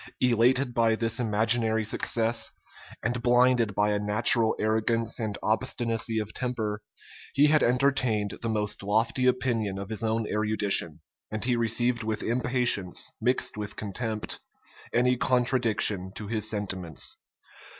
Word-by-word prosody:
Elated 125 +1 +3
by 115 -2 +2
this 115 0 -1
imaginary 110 0 +2
success, 115 +1 0 0.5
and 120 +1 -1
blinded 120 -3 +3
by 105 0 +2
a 105 - 0
natural 110 +2 +3
arrogance 110 +2 0
and 110 -3 -3
obstinacy 115 +1 -1
of 110 -1 -3
temper, 110 -5 -3 0.5
he 145 - +5
had 150 0 +4
entertained 125 -5 +1
the 115 - -2
most 105 -2 -2
lofty 115 +5 +1
opinion 115 -6 0
of 100 +1 -6
his 110 -2 -3
own 110 0 0
erudition; 105 -7 +1 0.3
and 110 +1 -4
he 125 -1 +1
received 120 +1 0
with 110 -1 -3
impatience, 125 -6 0
mixed 125 -1 0
with 105 0 -5
contempt, 110 +1 -4 0.5
any 125 +1 +2
contradiction 120 -7 +1
to 105 - -6
his 110 0 -2
sentiments. 95 -6 -1
115 Hz, 130 wpm, -27 LUFS, 105-120 Hz, 0.5 s, he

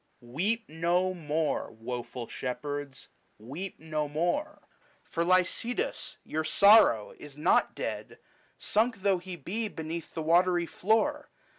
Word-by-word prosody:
Weep 195 - -1
no 175 +3 +1
more, 155 -2 -1
woful 120 +1 -6
shepherds, 145 +2 -5 0.3
weep 145 - -7
no 155 -2 -3
more, 175 - -2 0.4
For 170 - -2
Lycidas, 185 +7 0
your 155 +1 -2
sorrow, 200 - +6
is 145 -1 -11
not 150 - +2
dead,, - - -5 0.4
Sunk 220 -1 0
though 195 -3 +3
he 180 0 -7
be 200 - -3
beneath 165 -3 -6
the 160 - -2
watery 175 +2 +3
floor. 225 - 0
170 Hz, 120 wpm, -29 LUFS, 150-195 Hz, 0.4 s, sorrow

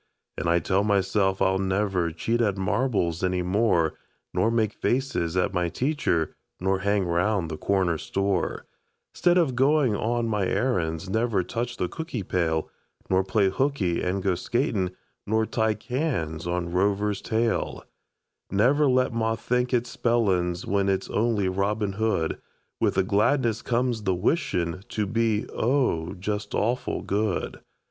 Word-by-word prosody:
An' - - -3
I 85 +1 +4
tell 95 +4 +1
myself 95 -1 +1
I'll 95 0 +2
never 95 -3 0
Cheat 115 +8 -1
at 100 -4 +1
marbles 95 -4 0
any 90 -1 +1
more, 90 -4 +2 0.4
Nor 90 +5 +2
make 110 -3 +1
faces 125 -10 -1
at 95 +2 +1
my 90 -2 0
teacher, 130 - 0 0.2
Nor 95 +1 +1
hang 100 0 +1
round 90 0 0
the 80 - -4
corner 90 -4 +1
store 95 -2 -1 0.5
'Stead 175 0 +3
of 155 -8 +2
goin' 135 -3 +3
on 115 +3 0
my 105 -4 0
errands; 85 -10 0
Never 110 -1 +1
touch 120 +4 -4
the 90 - 0
cookie 145 - -5
pail, 80 -3 0 0.4
Nor 95 0 +4
play 95 +1 +2
hooky 110 -8 0
an' 95 +2 -1
go 95 -1 +1
skatin', 105 - 0 0.4
Nor 110 +1 +2
tie 110 -1 0
cans 110 - -2
on 85 0 -2
Rover's 100 +2 +1
tail; 115 0 -1 0.7
Never 135 +9 +3
let 130 -1 +2
ma 115 -1 0
think 125 +3 -1
it's 120 -1 0
spellings 95 -7 +1
When 100 0 +1
it's 95 -1 -1
only 105 -3 +1
Robin 100 +2 0
Hood. 100 -6 -1 0.4
With - - +1
the 95 - +3
gladness 110 +4 +2
comes 120 -1 0
the 95 -3 0
wishin' 90 - 0
To 105 - -1
be, 115 0 0
oh, 115 - 0
just 105 +2 -4
awful 120 +4 -1
good! 100 -1 -1
100 Hz, 150 wpm, -26 LUFS, 90-115 Hz, 0.7 s, I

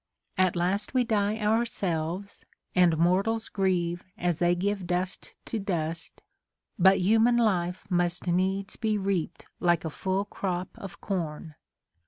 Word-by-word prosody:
At 185 -1 +2
last 195 +7 -1
we 255 - +4
die 215 -2 +1
ourselves, 200 -5 -1 0.3
and 175 -3 +4
mortals 195 +7 +1
grieve 175 -3 0
As 175 -4 0
they 175 0 +3
give 195 0 -2
dust 180 +1 -3
to 225 - -3
dust; 165 -4 -4 0.6
but 190 +2 +6
human 225 +5 +4
life 185 -6 +1
Must 175 -1 0
needs 190 +3 0
be 220 -2 0
reaped 190 -4 -2
like 175 -2 +2
a 160 - -3
full 190 +5 -1
crop 185 -3 -3
of 195 - -9
corn. 165 -4 -4
185 Hz, 135 wpm, -28 LUFS, 175-205 Hz, 0.6 s, but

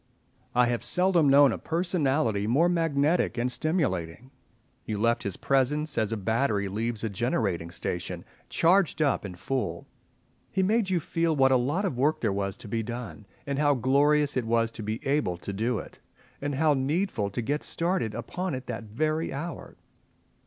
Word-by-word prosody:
I 125 0 +5
have 120 -1 -1
seldom 180 -5 +3
known 140 0 +7
a - - -3
personality 150 - 0
more 145 +9 +3
magnetic 165 -4 +1
and 125 +1 0
stimulating. 125 - -2 0.5
You 105 - -3
left 115 +3 +2
his 100 -3 -3
presence, 145 +3 +1
as 110 -1 0
a 115 - -1
battery 110 0 0
leaves 110 +2 -3
a 110 - 0
generating 100 -6 -1
station, 85 +1 -5 0.2
charged 175 0 +3
up 145 -5 +2
and 90 -3 -7
full. 105 -6 -3 0.7
He 190 - +1
made 210 +1 +2
you 180 -2 +2
feel 165 0 0
what 135 -1 +4
a - - +5
lot 145 +11 +1
of 130 -10 -2
work 155 +3 +2
there 110 -4 +1
was 100 0 -2
to - - -10
be 115 +2 -1
done, 115 -2 -7 0.2
and 140 0 -2
how 145 -1 +3
glorious 145 +4 +3
it 125 -3 0
was 115 0 +2
to 115 - -8
be 110 +3 -4
able 135 -11 0
to 100 +3 -6
do 115 +4 0
it, - - -9 0.4
and 145 0 -2
how 155 +1 +3
needful 140 - 0
to 100 - -3
get 145 +6 -1
started 170 - -1
upon 180 -4 -3
it 130 0 -6
that 115 -2 -5
very 155 +9 -1
hour. 165 +5 -6
130 Hz, 180 wpm, -27 LUFS, 110-155 Hz, 0.7 s, known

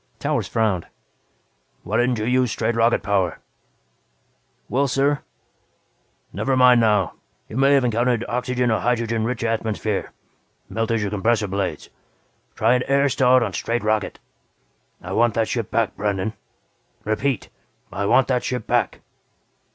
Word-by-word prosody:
Towers - - -1
frowned. 105 -6 0 1.0
"Why 105 +4 -1
didn't 120 0 +2
you 110 - -2
use 125 -1 +2
straight 120 - -1
rocket 115 -1 +2
power?" 95 -4 0 1.3
"Well, 140 +2 +1
sir 140 +2 +1 0.6
" - - -41
"Never 135 -1 0
mind 125 -2 +6
now. 105 -4 +2 0.3
You - - -10
may 135 +1 +4
have 135 -2 +4
encountered 120 0 +1
oxygen 125 0 -1
or 110 - +1
hydrogen 115 -2 0
rich 120 0 -3
atmosphere 110 -2 -2 0.6
melted 115 0 -1
your 100 -1 -2
compressor 105 +1 +1
blades. 95 0 -3 0.6
Try 115 +3 +3
an 125 -1 +1
air 140 +1 +3
start 130 -1 +4
on 105 -5 -3
straight 115 +3 -2
rocket. 110 0 0 0.9
I 90 - -7
want 115 +1 +2
that 115 -1 +1
ship 115 -3 -3
back, 115 -3 0
Brandon. 100 0 -2 0.7
Repeat, 110 +2 -1 0.4
I 100 - -2
want 130 +4 +4
that 125 -2 +1
ship 125 -3 -3
back!" - - 0
115 Hz, 145 wpm, -22 LUFS, 110-125 Hz, 1.3 s, mind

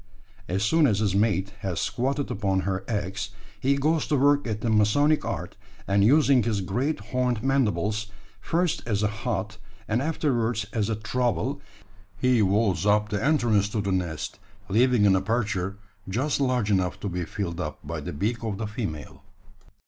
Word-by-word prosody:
As 95 +3 -1
soon 155 +7 +4
as 105 -5 +2
his 105 -2 +1
mate 100 -2 +1
has 90 -4 -3
squatted 135 +3 -1
upon 95 -2 0
her 95 0 -2
eggs, 100 -2 -3 0.3
he 140 +2 +2
goes 155 +3 +1
to 150 - +1
work 145 0 +3
at 110 -1 -3
the 115 - -1
masonic 145 +9 +3
art; 100 -4 -4 0.3
and 100 0 +3
using 140 +2 +5
his 105 -2 0
great 125 - -1
horned 125 -3 0
mandibles, 110 -6 +1 0.3
first 170 - 0
as 105 -2 0
a - - +4
hod, 110 -1 -3 0.3
and 115 +3 +1
afterwards 120 -8 0
as 110 -2 0
a 110 - 0
trowel, 120 +1 -1 0.6
he 125 0 +3
walls 100 -3 +2
up 105 +1 +3
the 105 0 -2
entrance 120 -9 +2
to 105 - -2
the 100 -1 -1
nest 90 -4 -3 0.3
leaving 120 +1 +4
an 95 -1 +5
aperture 100 -1 -1 0.3
just 135 +9 0
large 125 -6 +1
enough 95 -2 +1
to - - -3
be 90 -1 -2
filled 90 -1 -4
up - - -4
by - - -4
the - - -5
beak 110 +10 -2
of 110 -3 -2
the 110 - -3
female. 100 - -5
110 Hz, 170 wpm, -26 LUFS, 100-125 Hz, 0.6 s, using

